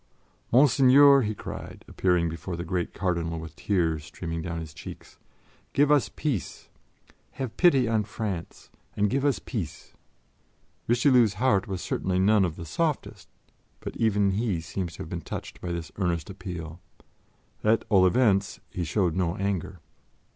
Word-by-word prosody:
"Monseigneur!" 135 Hz, +2 st, +7 dB
he 110 Hz, -2 st, -2 dB
cried, -, -, -8 dB
appearing 90 Hz, -2 st, +1 dB
before 85 Hz, +2 st, -5 dB
the 85 Hz, -, -4 dB
great 90 Hz, 0 st, -2 dB
Cardinal 85 Hz, -3 st, -2 dB
with 80 Hz, -1 st, -8 dB
tears 80 Hz, -6 st, 0 dB
streaming 85 Hz, 0 st, -5 dB
down 85 Hz, 0 st, -4 dB
his 80 Hz, -2 st, -8 dB
cheeks, -, -, -11 dB, 0.5 s
"give 145 Hz, +1 st, +4 dB
us 135 Hz, -8 st, +4 dB
peace! 125 Hz, -, -3 dB, 0.6 s
Have 130 Hz, -4 st, -5 dB
pity 140 Hz, -9 st, +4 dB
on 110 Hz, -2 st, +1 dB
France 105 Hz, -5 st, -5 dB, 0.3 s
and 105 Hz, -1 st, +2 dB
give 135 Hz, 0 st, 0 dB
us 145 Hz, -3 st, +2 dB
peace." 100 Hz, -, -6 dB, 0.9 s
Richelieu's 120 Hz, -3 st, +4 dB
heart 100 Hz, -3 st, +2 dB
was 95 Hz, -2 st, -4 dB
certainly 95 Hz, -1 st, -1 dB
none 100 Hz, +2 st, +4 dB
of 80 Hz, -3 st, -3 dB
the 85 Hz, -, -8 dB
softest, 150 Hz, -, -2 dB, 0.5 s
but -, -, -7 dB
even 105 Hz, -3 st, +2 dB
he 100 Hz, -3 st, 0 dB
seems 85 Hz, +2 st, -5 dB
to -, -, -7 dB
have 80 Hz, -, -10 dB
been 85 Hz, -1 st, -4 dB
touched -, -, -7 dB
by 90 Hz, -, -4 dB
this 85 Hz, -3 st, -5 dB
earnest 85 Hz, -3 st, -1 dB
appeal. 85 Hz, -4 st, -7 dB, 0.8 s
At 110 Hz, +1 st, +3 dB
all 95 Hz, -3 st, +5 dB
events, 100 Hz, -3 st, +2 dB
he 90 Hz, -, -3 dB
showed 85 Hz, 0 st, 0 dB
no 90 Hz, -2 st, 0 dB
anger. 95 Hz, -3 st, -3 dB
95 Hz, 155 wpm, -27 LUFS, 85-115 Hz, 0.9 s, Monseigneur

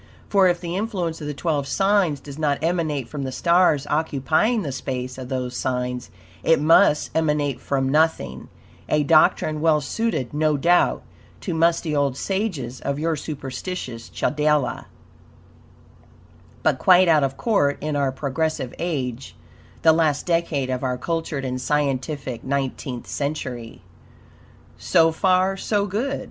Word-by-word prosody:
For, 195 Hz, -2 st, +5 dB
if 175 Hz, -1 st, +1 dB
the 175 Hz, -1 st, -4 dB
influence 185 Hz, -6 st, -3 dB
of 150 Hz, -, -5 dB
the 150 Hz, -, -3 dB
twelve 145 Hz, -2 st, -1 dB
signs 195 Hz, -6 st, +2 dB
does 140 Hz, +2 st, -10 dB
not 145 Hz, -2 st, +1 dB
emanate 160 Hz, -6 st, -1 dB
from 150 Hz, -, -6 dB
the 135 Hz, -1 st, -3 dB
stars 170 Hz, -2 st, +3 dB
occupying 155 Hz, -, +1 dB
the 145 Hz, -, -3 dB
space 130 Hz, -1 st, -5 dB
of 125 Hz, -1 st, -7 dB
those 125 Hz, -1 st, -3 dB
signs, 125 Hz, -1 st, -2 dB, 0.3 s
it 165 Hz, -, +3 dB
must 155 Hz, +1 st, +4 dB
emanate 150 Hz, -4 st, 0 dB
from 135 Hz, -1 st, -1 dB
nothing 135 Hz, -, 0 dB, 0.4 s
a 150 Hz, -1 st, +2 dB
doctrine 155 Hz, 0 st, +3 dB
well 160 Hz, -1 st, +4 dB
suited, 145 Hz, -, -2 dB
no 150 Hz, 0 st, +1 dB
doubt, 175 Hz, +5 st, +3 dB, 0.4 s
to 185 Hz, -, -3 dB
musty 165 Hz, -1 st, +1 dB
old 140 Hz, -2 st, +1 dB
sages 170 Hz, -, -3 dB
of 140 Hz, -, -2 dB
your 160 Hz, +2 st, 0 dB
superstitious 135 Hz, -3 st, -6 dB
Chaldea, 150 Hz, -3 st, 0 dB, 1.8 s
but -, -, +2 dB
quite 185 Hz, 0 st, +6 dB
out 155 Hz, -3 st, +4 dB
of 135 Hz, 0 st, -1 dB
court 145 Hz, -, +1 dB
in 150 Hz, 0 st, -3 dB
our 140 Hz, -2 st, +1 dB
progressive 140 Hz, 0 st, -2 dB
age 135 Hz, -7 st, -3 dB, 0.5 s
the 160 Hz, -, +7 dB
last 155 Hz, -3 st, +1 dB
decade 165 Hz, -6 st, 0 dB
of 125 Hz, -1 st, -2 dB
our 125 Hz, -1 st, -1 dB
cultured 160 Hz, -1 st, -3 dB
and 130 Hz, 0 st, -3 dB
scientific 135 Hz, -2 st, -2 dB
nineteenth 135 Hz, -2 st, -3 dB
century. 130 Hz, -5 st, -5 dB, 1.0 s
So 165 Hz, -1 st, +3 dB
far, 185 Hz, +3 st, +2 dB
so 205 Hz, 0 st, 0 dB
good. 230 Hz, +8 st, -2 dB
150 Hz, 140 wpm, -23 LUFS, 135-170 Hz, 1.8 s, the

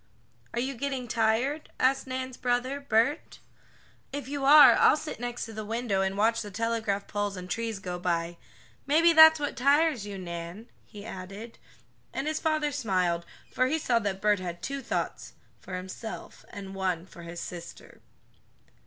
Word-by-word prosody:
"Are -, -, 0 dB
you 265 Hz, +3 st, -1 dB
getting 265 Hz, -1 st, -3 dB
tired?" 235 Hz, +7 st, 0 dB
asked 265 Hz, +1 st, +2 dB
Nan's 260 Hz, 0 st, -4 dB
brother 250 Hz, +3 st, -1 dB
Bert. 280 Hz, +4 st, +1 dB, 0.7 s
"If 280 Hz, -2 st, -5 dB
you 280 Hz, 0 st, -3 dB
are 290 Hz, 0 st, +9 dB
I'll -, -, +5 dB
sit 310 Hz, -6 st, -6 dB
next 245 Hz, 0 st, -4 dB
to 225 Hz, -, -10 dB
the 215 Hz, 0 st, -5 dB
window, 220 Hz, -2 st, -1 dB
and 190 Hz, 0 st, -1 dB
watch 225 Hz, +2 st, +2 dB
the 210 Hz, -, -6 dB
telegraph 220 Hz, -1 st, -1 dB
poles 205 Hz, -1 st, -3 dB
and 180 Hz, 0 st, -7 dB
trees 225 Hz, +3 st, -3 dB
go 180 Hz, -2 st, -5 dB
by. 170 Hz, -1 st, -1 dB, 0.5 s
Maybe 330 Hz, +4 st, +5 dB
that's 315 Hz, 0 st, +9 dB
what 290 Hz, -1 st, -2 dB
tires 280 Hz, -1 st, +3 dB
you, 200 Hz, -1 st, -6 dB
Nan," 175 Hz, +5 st, -7 dB, 0.2 s
he 205 Hz, -2 st, -11 dB
added, 200 Hz, +3 st, -8 dB, 0.5 s
and 270 Hz, -, -3 dB
his 310 Hz, 0 st, -1 dB
father 310 Hz, -2 st, 0 dB
smiled, 185 Hz, -10 st, 0 dB, 0.2 s
for 255 Hz, -, +2 dB
he 310 Hz, +5 st, +1 dB
saw 245 Hz, -6 st, +1 dB
that 195 Hz, -3 st, -3 dB
Bert 210 Hz, -1 st, +3 dB
had 175 Hz, -1 st, -6 dB
two 275 Hz, +5 st, -3 dB
thoughts -, -, -3 dB, 0.3 s
for 185 Hz, -, -7 dB
himself, 190 Hz, +5 st, -8 dB
and 195 Hz, -1 st, -8 dB
one 185 Hz, -3 st, -2 dB
for 180 Hz, -2 st, -13 dB
his 170 Hz, 0 st, -8 dB
sister. 175 Hz, -1 st, -9 dB
225 Hz, 170 wpm, -28 LUFS, 190-270 Hz, 0.7 s, are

